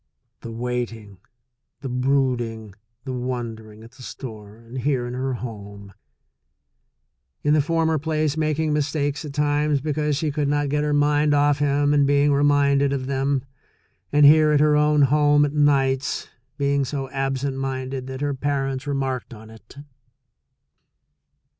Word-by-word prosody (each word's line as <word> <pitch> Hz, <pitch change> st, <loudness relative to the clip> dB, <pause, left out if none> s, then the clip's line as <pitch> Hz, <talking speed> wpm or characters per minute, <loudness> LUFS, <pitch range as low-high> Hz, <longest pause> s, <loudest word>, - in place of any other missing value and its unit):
The 115 Hz, -, -8 dB
waiting, 115 Hz, -4 st, -5 dB, 0.6 s
the 140 Hz, -, -5 dB
brooding, 125 Hz, -4 st, -1 dB, 0.3 s
the 130 Hz, -, -5 dB
wondering, 115 Hz, -4 st, -5 dB
at 115 Hz, -, -14 dB
the 130 Hz, -, -17 dB
store 110 Hz, -5 st, -9 dB
and 115 Hz, +3 st, -9 dB
here 125 Hz, -1 st, 0 dB
in 120 Hz, -, -5 dB
her 130 Hz, +1 st, -2 dB
home 100 Hz, -4 st, -9 dB, 0.8 s
— 60 Hz, +2 st, -52 dB
in 150 Hz, -, +3 dB
the 155 Hz, -, +4 dB
former 160 Hz, 0 st, 0 dB
place 155 Hz, -1 st, -1 dB
making 155 Hz, 0 st, 0 dB
mistakes 145 Hz, 0 st, -1 dB
at 145 Hz, -, -7 dB
times 150 Hz, 0 st, +1 dB
because 150 Hz, 0 st, -1 dB
she 155 Hz, -1 st, -1 dB
could 145 Hz, -1 st, -1 dB
not 145 Hz, 0 st, 0 dB
get 150 Hz, +1 st, 0 dB
her 150 Hz, -, 0 dB
mind 145 Hz, 0 st, +2 dB
off 145 Hz, 0 st, +2 dB
him 145 Hz, 0 st, +2 dB
and 145 Hz, -1 st, +3 dB
being 145 Hz, +1 st, +3 dB
reminded 140 Hz, -1 st, +3 dB
of 130 Hz, -2 st, -3 dB
them, 135 Hz, 0 st, -1 dB, 0.7 s
and 145 Hz, 0 st, +5 dB
here 155 Hz, +1 st, +6 dB
at 150 Hz, -, +3 dB
her 150 Hz, 0 st, +4 dB
own 150 Hz, 0 st, +3 dB
home 145 Hz, +1 st, +4 dB
at 145 Hz, -, -4 dB
nights, 135 Hz, -2 st, +1 dB, 0.3 s
being 140 Hz, -1 st, +1 dB
so 135 Hz, 0 st, -4 dB
absent 135 Hz, 0 st, -2 dB
minded 130 Hz, -1 st, -4 dB
that 130 Hz, +1 st, -7 dB
her 145 Hz, -1 st, -1 dB
parents 135 Hz, 0 st, -2 dB
re 140 Hz, -, -1 dB
marked 130 Hz, -3 st, -3 dB
on 110 Hz, +1 st, -13 dB
it. 110 Hz, +4 st, -16 dB
140 Hz, 155 wpm, -23 LUFS, 125-145 Hz, 0.8 s, here